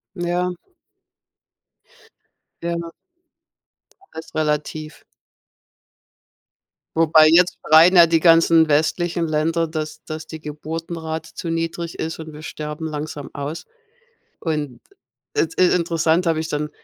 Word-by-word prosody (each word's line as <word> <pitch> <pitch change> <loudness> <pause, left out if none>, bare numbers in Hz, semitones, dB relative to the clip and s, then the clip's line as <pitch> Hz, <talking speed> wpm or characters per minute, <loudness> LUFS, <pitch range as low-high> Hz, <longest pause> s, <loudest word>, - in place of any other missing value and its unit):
Ja. 175 0 -1 2.1
Ja 170 0 -3 1.2
Alles 160 - -9
relativ. 155 0 -3 1.9
Wobei 155 -1 +6
jetzt 180 +3 +4
schreien 165 +4 +7
ja 170 -1 +9
die 165 -1 +2
ganzen 165 -1 +5
westlichen 165 +3 +1
Länder, 160 +2 0
dass 155 -1 -5
dass 155 0 -7
die 160 0 -9
Geburtenrate 160 +2 -6
zu 170 - -5
niedrig 165 0 -3
ist. 160 +1 -4
Und 160 -1 -8
wir 150 +1 -11
sterben 150 +1 -6
langsam 150 -1 -6
aus. 145 +3 -5 0.8
Und, 150 -6 -3 0.5
äh, - - +2
es 165 - -13
ist 180 -1 +4
interessant. 170 0 +1
Habe 165 -1 +1
ich 160 0 -4
dann 150 0 -2
160 Hz, 115 wpm, -21 LUFS, 155-170 Hz, 2.1 s, ja